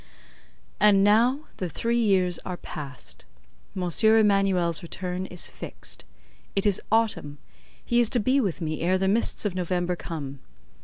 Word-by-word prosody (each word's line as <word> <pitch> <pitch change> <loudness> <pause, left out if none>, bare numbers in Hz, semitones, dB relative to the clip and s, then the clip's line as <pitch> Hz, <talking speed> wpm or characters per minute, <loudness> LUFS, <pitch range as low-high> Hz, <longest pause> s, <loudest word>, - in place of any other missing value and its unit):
And 200 -2 +5
now 235 +7 +4 0.2
the 180 - -3
three 235 +8 -1
years 185 -6 +2
are 180 -1 -6
past: 140 -7 -8 0.5
M. 185 - -1 0.2
Emanuel's 195 -6 +3
return 180 +2 -4
is 180 - -4
fixed. - - -7 0.5
It 195 - +1
is 205 -3 +2
Autumn; 220 -10 +1 0.5
he 240 - +2
is 235 -2 +4
to 245 - +2
be 260 +5 +2
with 190 -6 -2
me 155 -1 -3
ere 180 +3 +2
the 190 0 0
mists 220 +2 +1
of 205 - 0
November 180 0 -1
come. 140 -6 -6
190 Hz, 150 wpm, -26 LUFS, 175-220 Hz, 0.5 s, And